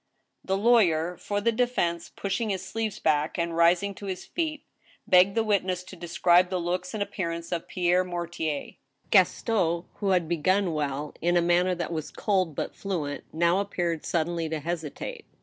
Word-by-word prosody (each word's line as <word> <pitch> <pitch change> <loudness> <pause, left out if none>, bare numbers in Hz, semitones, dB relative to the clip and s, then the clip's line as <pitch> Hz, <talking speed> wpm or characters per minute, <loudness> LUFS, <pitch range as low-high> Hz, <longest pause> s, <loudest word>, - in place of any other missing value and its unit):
The 190 0 0
lawyer 180 -7 +3
for 205 0 -2
the 230 +3 +3
defense, 220 -8 0
pushing 205 +3 -2
his 190 -2 -2
sleeves 220 -2 -3
back, 155 -3 +1
and 170 -1 -1
rising 175 +4 +3
to 200 +1 -9
his 185 -1 -4
feet, 315 -3 -3 0.4
begged 185 +2 +5
the 225 - +2
witness 185 -4 0
to 185 - -11
describe 175 +1 +3
the 185 - -1
looks 180 +8 -2
and 205 - 0
appearance 170 -4 -4
of 170 -2 -3
Pierre 180 0 +2
Mortier. 170 -4 -4 0.3
Gaston, 180 -3 +3
who 200 - -1
had 180 -3 +2
begun 180 +2 +1
well, 145 -1 -2
in 175 +1 +2
a - - +4
manner 175 +1 +3
that 170 0 -3
was 155 -2 -4
cold 185 -7 0
but - - -3
fluent, 160 -8 -4
now 170 +3 +2
appeared 175 -5 -2
suddenly 165 -1 -1
to 160 -1 -2
hesitate. 160 -1 -5
175 Hz, 170 wpm, -27 LUFS, 170-195 Hz, 0.4 s, begged